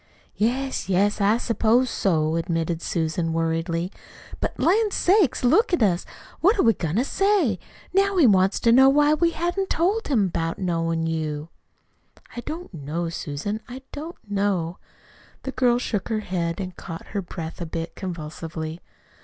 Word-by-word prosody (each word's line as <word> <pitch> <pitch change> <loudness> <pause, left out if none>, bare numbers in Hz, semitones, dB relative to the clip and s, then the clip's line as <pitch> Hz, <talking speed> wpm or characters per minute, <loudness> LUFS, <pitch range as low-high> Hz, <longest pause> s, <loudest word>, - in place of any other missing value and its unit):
"Yes, 255 +2 -1
yes, 200 +3 +2
I 205 +3 +4
s'pose 235 +2 +2
so," 160 -4 +1
admitted 165 0 -1
Susan 165 0 -1
worriedly. 165 +2 -1 0.5
"But, - - -3
lan' 425 +5 +3
sakes, 380 - +2
look 360 - +4
at 340 - +3
us! 180 -4 +1 0.3
What 400 +7 +4
are - - +3
we 225 - +5
goin' 165 -4 -3
to 235 - +3
say? 360 - +2 0.3
Now 390 0 +3
he 330 - +6
wants 190 -3 +4
to 230 - +4
know 265 +3 +7
why 295 +2 +4
we 335 +2 +3
hain't 350 +4 -2
told 390 +7 +1
him 230 -9 +3
about 165 -2 -2
knowin' 165 -3 -1
you." 155 -1 -3 0.9
"I - - -4
don't 325 - -7
know, 165 +2 -3
Susan, 165 +7 -4
I 260 +2 -8
don't 320 +4 -7
know." 195 -4 -1 0.6
The 265 - -3
girl 250 -2 +3
shook 220 -4 -2
her 220 -2 0
head 170 -3 -2
and 185 -2 -5
caught 165 0 -8
her 200 - -2
breath 170 -2 -7
a 170 - -3
bit 165 +1 -4
convulsively. 160 -2 -6
200 Hz, 160 wpm, -24 LUFS, 165-270 Hz, 0.9 s, know